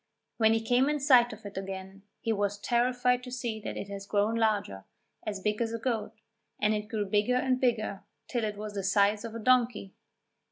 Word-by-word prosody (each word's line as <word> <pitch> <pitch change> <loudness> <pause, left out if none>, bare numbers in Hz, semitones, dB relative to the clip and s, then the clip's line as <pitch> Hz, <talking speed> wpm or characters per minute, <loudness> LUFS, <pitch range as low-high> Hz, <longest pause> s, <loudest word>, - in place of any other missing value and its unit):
When 220 -1 +4
he 225 - +1
came 250 +4 +3
in 300 0 0
sight 255 -4 +5
of 215 -1 -11
it 200 -1 -5
again, 190 0 -7 0.2
he 225 - 0
was 205 -1 -1
terrified 245 +2 +1
to 250 - -9
see 240 -3 -3
that 210 - -6
it - - -5
had 200 0 -6
grown 205 +2 +1
larger 210 - 0 0.4
as 205 -2 -2
big 210 +2 -1
as 230 -1 -1
a - - -1
goat 230 -2 -2 0.5
and 210 +1 +2
it 210 0 -3
grew 215 -2 -1
bigger 210 +5 +2
and 255 0 +1
bigger 215 -6 0 0.3
till 240 -3 -2
it 210 -1 -2
was 210 0 -6
the 200 - -2
size 200 +2 +3
of 230 -1 -6
a - - -4
donkey! 235 -4 +2
220 Hz, 210 wpm, -29 LUFS, 205-245 Hz, 0.5 s, sight